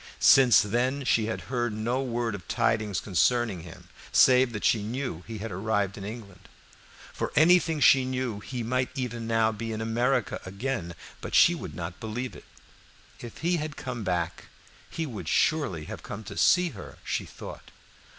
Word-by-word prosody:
Since 130 -3 +7
then 125 +6 0
she 110 -2 +2
had 110 - -3
heard 120 -3 -2
no 120 +5 -1
word 120 -3 -2
of 95 -4 -8
tidings 105 -3 0
concerning 105 +1 +1
him, 80 0 -12 0.2
save 130 -1 +5
that 105 -2 -4
she 110 - +3
knew 110 - -4
he 115 -1 -6
had 110 +1 -6
arrived 100 +1 -1
in 100 - -8
England. 105 -3 -9 0.6
For - - -3
anything 165 0 +4
she 135 -2 +6
knew 130 -4 -2
he 120 +3 -5
might 125 +2 0
even 120 -4 -4
now 115 -1 +2
be 115 +1 -5
in 110 - -4
America 120 +2 0
again, 100 -3 -4 0.3
but - - -4
she - - +7
would - - -7
not 85 0 -6
believe 120 +3 -5
it. - - -13 0.7
If 120 -2 -9
he 175 0 +2
had 150 -2 -5
come 125 -5 -5
back 90 -2 -2 0.4
he 165 - -3
would 105 - -7
surely 140 - +1
have - - -8
come 105 +2 -7
to - - -9
see 180 -1 +4
her, 110 -10 -10
she - - -2
thought. - - -10
115 Hz, 175 wpm, -27 LUFS, 105-130 Hz, 0.7 s, Since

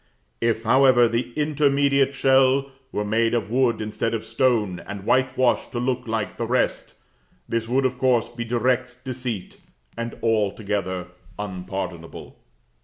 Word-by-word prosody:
If, 115 -1 +1
however, 125 0 +5
the 115 +2 -2
intermediate 140 -2 +2
shell 135 +1 +3 0.2
were 105 - -2
made 115 +2 +1
of 110 -2 -2
wood 125 -2 +2
instead 110 +2 -2
of 110 - -4
stone, 115 -5 +1
and 100 -1 -6
whitewashed 130 -1 +2
to 120 - -2
look 125 0 -1
like 110 -2 -2
the 115 - -2
rest, 125 +2 0 0.5
this 115 -1 -2
would, 130 +3 +1
of 125 -1 -1
course, 125 -3 +2
be 120 0 -6
direct 125 +1 -1
deceit, 125 -6 -5 0.3
and 115 0 -5
altogether 100 -4 -1 0.3
unpardonable. 95 -3 -6
120 Hz, 135 wpm, -23 LUFS, 110-130 Hz, 0.5 s, however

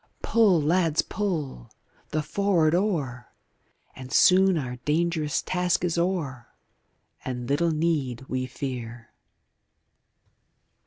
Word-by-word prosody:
Pull, 210 -7 +4
lads, 165 +1 +2
pull! 160 - -4 0.4
the 155 0 -1
for'ard 165 -1 +1
oar, 155 - -2 0.6
And 130 -1 -10
soon 190 0 +5
our 125 -4 -4
dangerous 155 +2 -1
task 180 -1 0
is 170 -2 0
o'er, 165 -9 -2 0.8
And 125 -2 -5
little 150 +5 +1
need 155 -6 -1
we 130 0 -2
fear. 120 -3 -6
155 Hz, 100 wpm, -26 LUFS, 130-175 Hz, 0.8 s, soon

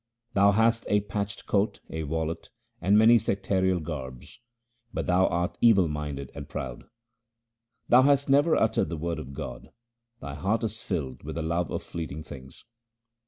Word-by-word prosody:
Thou 100 +1 +5
hast 115 +2 +2
a 105 0 +3
patched 100 0 -4
coat, 100 +1 0
a 80 - -3
wallet, 80 +2 -3 0.3
and 100 +4 +4
many 115 +2 +7
sectarial 95 -2 0
garbs, 70 - -7 0.5
but - - -3
thou 90 +1 +3
art 85 +1 -1
evil 100 -7 +5
minded 75 -3 -5
and - - -8
proud. - - -6 1.0
Thou 125 - +7
hast 140 +1 +3
never 145 +4 +4
uttered 110 - +1
the 85 - -4
Word 85 +2 -3
of 70 +1 -8
God; - - -7 0.5
thy 70 0 -7
heart 100 +10 -1
is 110 0 -3
filled 75 -9 -4
with 80 +2 -7
the 85 - -2
love 85 0 -1
of - - -4
fleeting 80 -2 -6
things. 65 -3 -12
90 Hz, 165 wpm, -27 LUFS, 75-105 Hz, 1.0 s, many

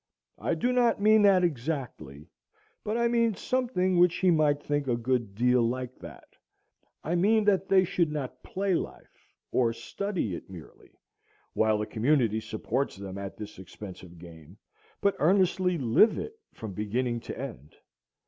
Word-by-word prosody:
I - - -1
do 245 +10 0
not 245 -3 +3
mean 215 +1 +5
that 195 -3 +5
exactly, 125 - -3 0.6
but 215 +2 -2
I 235 0 +2
mean 230 -2 +2
something 185 -7 0
which 175 -1 +5
he 185 -1 +3
might 150 -3 +3
think 145 -1 -1
a 120 -2 +1
good 120 -4 -1
deal 125 +2 +3
like 125 +2 -2
that; - - -11 0.8
I 165 - -2
mean 210 +5 +3
that 195 -2 +2
they 190 -1 +5
should 170 -3 0
not 130 -4 -5
play 195 0 -2
life, - - -6 0.2
or 115 -2 +2
study 140 - -3
it - - -8
merely, 90 -5 -13 0.6
while 110 -1 +2
the 105 - -2
community 115 -1 +1
supports 115 +5 -3
them 100 0 -7
at 100 -1 -7
this 105 -3 -9
expensive 95 -2 -11
game, 85 +1 -13 0.4
but 200 -1 +2
earnestly 180 +1 +2
live 135 - +4
it 435 - -5 0.2
from 110 -3 -8
beginning 120 +4 -2
to - - -8
end. 70 +4 -8
140 Hz, 160 wpm, -28 LUFS, -, 0.8 s, mean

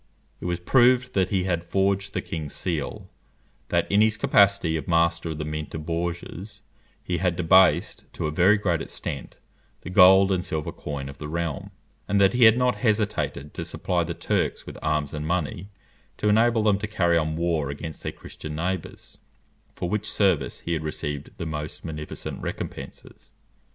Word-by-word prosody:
It - - -8
was 90 -1 -1
proved 125 +5 +4
that 95 -2 +1
he 95 -2 +1
had 85 -2 -1
forged 95 +2 0
the - - -1
king's 75 -3 -5
seal; 80 -6 -3 0.6
that - - +2
in 100 +1 +5
his 110 0 +3
capacity 100 -10 +3
of 75 -3 -4
master 85 0 +2
of 80 - -4
the 75 - -4
mint 75 0 -5
of 75 -1 -5
Bourges, 85 +4 -5 0.4
he 90 - -2
had 90 -1 +1
debased, 90 +1 +3
to - - -3
a 75 - -1
very 90 +7 +4
great 90 -5 0
extent, 70 - -6 0.4
the 90 - -7
gold 95 +1 +7
and 90 -2 +1
silver 80 -4 -3
coin 70 -2 -6
of 70 - -10
the 75 - -5
realm; 80 -3 -3 0.4
and 100 0 +2
that 100 -1 +5
he 125 -1 +6
had 110 +1 +7
not 125 0 +2
hesitated 105 - -1
to - - -4
supply - - -1
the - - -4
Turks - - -1
with - - -9
arms 75 -2 -1
and 75 0 -4
money 85 +2 -2 0.5
to 105 - +1
enable 115 +1 +3
them 105 -2 +3
to 105 - -3
carry 85 -5 +1
on 80 -1 +1
war 80 -4 0
against 75 +3 -6
their - - -3
Christian 75 -1 -9
neighbours, 90 +2 -4 0.6
for 90 - -3
which 105 +3 -2
service 95 -7 +1
he 85 - -2
had 80 -1 -2
received 75 -2 -4
the - - -4
most 75 -1 -5
munificent 75 -2 -6
recompenses. - - -7
85 Hz, 180 wpm, -25 LUFS, 80-100 Hz, 0.6 s, gold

